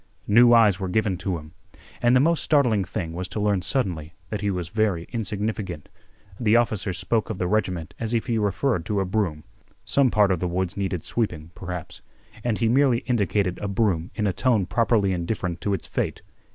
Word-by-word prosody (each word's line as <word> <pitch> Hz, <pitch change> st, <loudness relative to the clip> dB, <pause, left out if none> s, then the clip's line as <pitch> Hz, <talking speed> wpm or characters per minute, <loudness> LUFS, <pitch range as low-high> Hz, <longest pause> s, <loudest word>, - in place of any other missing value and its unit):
New 120 Hz, +3 st, +6 dB
eyes 110 Hz, -5 st, +5 dB
were 95 Hz, -2 st, -3 dB
given 105 Hz, 0 st, +1 dB
to 95 Hz, -1 st, -2 dB
him. 75 Hz, -1 st, -11 dB, 0.5 s
And 120 Hz, +1 st, +4 dB
the -, -, +6 dB
most 165 Hz, +4 st, +3 dB
startling 125 Hz, -10 st, +3 dB
thing 85 Hz, -2 st, -4 dB
was 90 Hz, +2 st, -4 dB
to 95 Hz, +3 st, -5 dB
learn 105 Hz, -2 st, +1 dB
suddenly 90 Hz, -, -2 dB, 0.2 s
that 105 Hz, -1 st, -3 dB
he 105 Hz, -, 0 dB
was 90 Hz, -3 st, -3 dB
very 105 Hz, -5 st, 0 dB
insignificant. 105 Hz, -6 st, -3 dB, 0.5 s
The 110 Hz, -1 st, +3 dB
officer 110 Hz, -4 st, +1 dB
spoke 95 Hz, +6 st, -1 dB
of 110 Hz, -, -3 dB
the 90 Hz, -, -1 dB
regiment 90 Hz, -5 st, -1 dB
as 115 Hz, -1 st, -3 dB
if 115 Hz, -2 st, 0 dB
he 115 Hz, -3 st, 0 dB
referred 105 Hz, 0 st, 0 dB
to 105 Hz, -2 st, 0 dB
a 95 Hz, -, 0 dB
broom. 90 Hz, -6 st, -1 dB, 0.4 s
Some 140 Hz, -2 st, +3 dB
part 105 Hz, -3 st, +3 dB
of 90 Hz, -, +1 dB
the 90 Hz, -, -1 dB
woods 90 Hz, +2 st, -2 dB
needed 95 Hz, -4 st, -2 dB
sweeping, 85 Hz, -8 st, -2 dB
perhaps, 90 Hz, -3 st, -7 dB, 0.4 s
and 115 Hz, -3 st, 0 dB
he 115 Hz, -, +1 dB
merely 125 Hz, 0 st, +3 dB
indicated 100 Hz, -5 st, 0 dB
a 105 Hz, -, -3 dB
broom 95 Hz, -5 st, 0 dB
in 105 Hz, -, -1 dB
a 100 Hz, -, +1 dB
tone 115 Hz, -1 st, +2 dB
properly 105 Hz, 0 st, +2 dB
indifferent 85 Hz, -1 st, -3 dB
to 100 Hz, -, 0 dB
its -, -, -7 dB
fate. -, -, -3 dB
100 Hz, 200 wpm, -24 LUFS, 90-115 Hz, 0.5 s, New